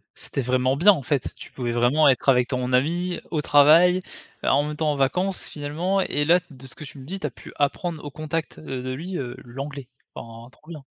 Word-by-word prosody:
C'était 140 - -4
vraiment 130 +1 +1
bien 190 +7 +7
en 145 - -5
fait, 135 0 -1
tu - - -11
pouvais 120 -2 -3
vraiment 120 +6 +3
être 130 0 +1
avec 125 -2 +4
ton 125 -1 -2
ami, 170 +7 +1
au 155 -3 -1
travail, 155 +6 +6 0.4
heu, - - -3
en 145 - +3
même 150 0 -4
temps 155 0 0
en - - -1
vacances 180 +8 0
finalement. 165 +7 -1
Et 145 -5 0
là 175 +4 +5
de 135 -3 -13
ce 130 - -8
que - - -10
tu 145 - -10
me 130 - -11
dis, 190 +7 -5
tu 150 - -2
as - - -7
pu - - -13
apprendre 155 +3 -1
au 145 - -5
contact, 155 +2 -4
heu, 130 -4 -5
de 130 0 -3
lui, 175 +7 -5
heu, 125 -4 -5
l'anglais. 135 +2 -7 0.3
Enfin 115 +1 -10
trop 150 - -24
bien. 155 -4 -9
145 Hz, 235 wpm, -24 LUFS, 130-165 Hz, 0.4 s, bien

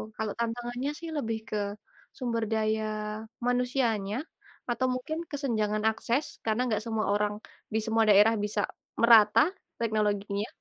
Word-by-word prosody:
Kalau 220 -1 -2
tantangannya 240 +3 -2
sih 335 -1 -6
lebih 225 -5 -1
ke 215 - -1 0.6
sumber 235 -3 -1
daya 220 0 +1 0.6
manusianya 245 -4 +1 0.5
atau 255 +2 +1
mungkin 255 +5 -3
kesenjangan 215 -7 -1
akses 235 +5 -2
karena 220 +2 +1
nggak 215 0 0
semua 220 -2 -1
orang 205 0 +1 0.4
di 220 - +2
semua 225 0 +3
daerah 210 +2 +7
bisa 210 0 -1 0.4
merata 230 +5 +7 0.3
teknologinya. 210 -2 0
225 Hz, 125 wpm, -29 LUFS, 210-245 Hz, 0.6 s, daerah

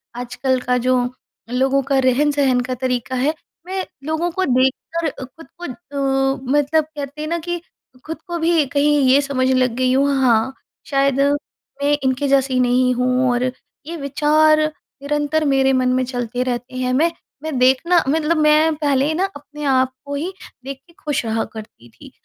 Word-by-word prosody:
आजकल 250 +2 -1
का 250 0 +1
जो 255 +1 +2 0.5
लोगों 265 +2 +2
का 275 0 +1
रहन-सहन 270 0 +2
का 255 +1 -3
तरीका 255 0 -2
है, 270 +5 +1 0.3
मैं 375 +1 -3 0.2
लोगों 315 +4 -1
को 375 +3 -1
देखकर 265 +6 0 0.2
खुद 325 +6 -16
को - - -4
अ, 270 -2 -1 0.2
मतलब 300 +2 +2
कहते 295 -1 -8
हैं 305 - -3
ना 340 - 0
कि 345 +1 -4 0.4
खुद 320 +1 -6
को 345 -1 -3
भी 325 -2 +2
कहीं 290 +2 +2
ये 275 +2 +5
समझने 260 -2 0
लग 255 -1 +2
गई 255 0 +1
हूँ, 275 +2 +3
हाँ, 240 0 +3 0.3
शायद 275 -1 +1 0.6
मैं 290 +1 +3
इनके 265 +2 0
जैसी 270 -1 +2
नहीं 250 0 +3
हूँ 255 +1 +1
और 245 0 0 0.4
ये 335 - -5
विचार 305 +2 +3 0.4
निरंतर 295 +2 0
मेरे 270 -1 +3
मन 255 -1 +2
में 255 0 +1
चलते 245 -1 -3
रहते 245 0 -4
हैं। 255 0 -1
मैं 320 +6 +3 0.3
मैं 315 -4 -3
देखना 265 +8 +4
मतलब 320 +2 +1
मैं 305 +1 +4
पहले 290 0 +1
ना, 360 +4 +1
अपने 295 +1 -10
आप 260 -1 +2
को 285 - -5
ही 335 +7 -3 0.3
देख 275 +1 -6
के 340 - -21
खुश 295 -5 -1
रहा 225 0 0
करती 215 - -11
थी - - -15
275 Hz, 175 wpm, -20 LUFS, 255-305 Hz, 0.6 s, ये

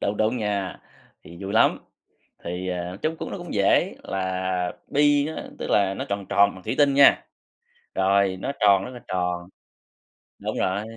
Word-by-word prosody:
Đúng, 100 - -1
đúng 110 +4 +1
nha. 100 -3 -2 0.4
Thì 85 +1 -13
vui 95 +1 -4
lắm, 110 - +4 0.7
thì, 90 +2 -4
à, 90 0 -4
chung 160 +1 -1
cũng - - -5
nó - - -4
cũng 175 -2 -8
dễ, 100 -1 +2
là 95 -1 -2 0.2
bi 145 0 +3
á, - - -5 0.2
tức - - -4
là 100 -1 +3
nó - - -4
tròn 100 -1 -3
tròn 100 0 +4
bằng 95 - -13
thủy - - -2
tinh 145 -1 +4
nha, 140 0 +6 0.7
rồi 95 0 +2
nó - - -2
tròn 100 -2 +4
rất 125 - -7
là 125 - -9
tròn, 90 -1 -2 0.9
đúng - - -4
rồi. 95 +3 0
100 Hz, 180 wpm, -24 LUFS, 95-110 Hz, 0.9 s, nha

